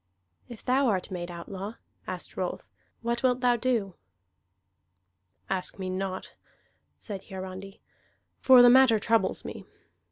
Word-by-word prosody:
"If 235 Hz, -3 st, -11 dB
thou 265 Hz, +2 st, +3 dB
art 190 Hz, -5 st, -1 dB
made 175 Hz, -1 st, -4 dB
outlaw," 190 Hz, +5 st, -7 dB, 0.3 s
asked -, -, -6 dB
Rolf, -, -, -3 dB, 0.4 s
"what 235 Hz, 0 st, -1 dB
wilt 255 Hz, -1 st, +2 dB
thou 245 Hz, -1 st, +4 dB
do?" 230 Hz, -5 st, 0 dB, 1.5 s
"Ask 190 Hz, -1 st, -1 dB
me 185 Hz, -1 st, -4 dB
not," 185 Hz, 0 st, -4 dB, 0.6 s
said 200 Hz, -4 st, -7 dB
Hiarandi. 190 Hz, +1 st, -8 dB, 0.6 s
"For 255 Hz, -2 st, +8 dB
the 245 Hz, -, +9 dB
matter 260 Hz, -3 st, +6 dB
troubles 225 Hz, +2 st, +1 dB
me. -, -, -7 dB
210 Hz, 125 wpm, -28 LUFS, 190-245 Hz, 1.5 s, the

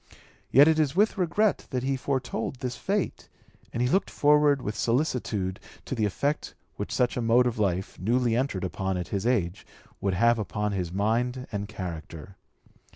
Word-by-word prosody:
Yet 140 Hz, +4 st, +7 dB
it 160 Hz, -1 st, +4 dB
was 150 Hz, -1 st, +1 dB
with 210 Hz, +3 st, +3 dB
regret 195 Hz, +2 st, +1 dB
that 125 Hz, -2 st, -2 dB
he 135 Hz, +1 st, 0 dB
foretold 130 Hz, -3 st, -2 dB
this 125 Hz, -1 st, -4 dB
fate, 200 Hz, -1 st, -2 dB, 0.4 s
and 120 Hz, -, -1 dB
he -, -, +2 dB
looked 190 Hz, +10 st, +1 dB
forward 150 Hz, -1 st, +4 dB
with 105 Hz, -, -3 dB
solicitude 115 Hz, -7 st, -1 dB, 0.3 s
to -, -, -4 dB
the 110 Hz, -4 st, +1 dB
effect 140 Hz, +9 st, -2 dB, 0.2 s
which -, -, -5 dB
such 125 Hz, 0 st, +1 dB
a -, -, 0 dB
mode 120 Hz, +2 st, +4 dB
of 120 Hz, -3 st, -1 dB
life, 95 Hz, -2 st, -1 dB
newly 120 Hz, +4 st, +1 dB
entered 120 Hz, -7 st, -1 dB
upon 95 Hz, 0 st, -2 dB
at 90 Hz, -, -4 dB
his 100 Hz, +3 st, -1 dB
age, 105 Hz, -5 st, 0 dB, 0.4 s
would 100 Hz, -2 st, 0 dB
have 115 Hz, +4 st, +3 dB
upon 105 Hz, 0 st, -2 dB
his 90 Hz, -4 st, -2 dB
mind 120 Hz, +6 st, 0 dB
and 100 Hz, 0 st, -3 dB
character. 90 Hz, -3 st, -7 dB
120 Hz, 175 wpm, -27 LUFS, 100-135 Hz, 0.4 s, Yet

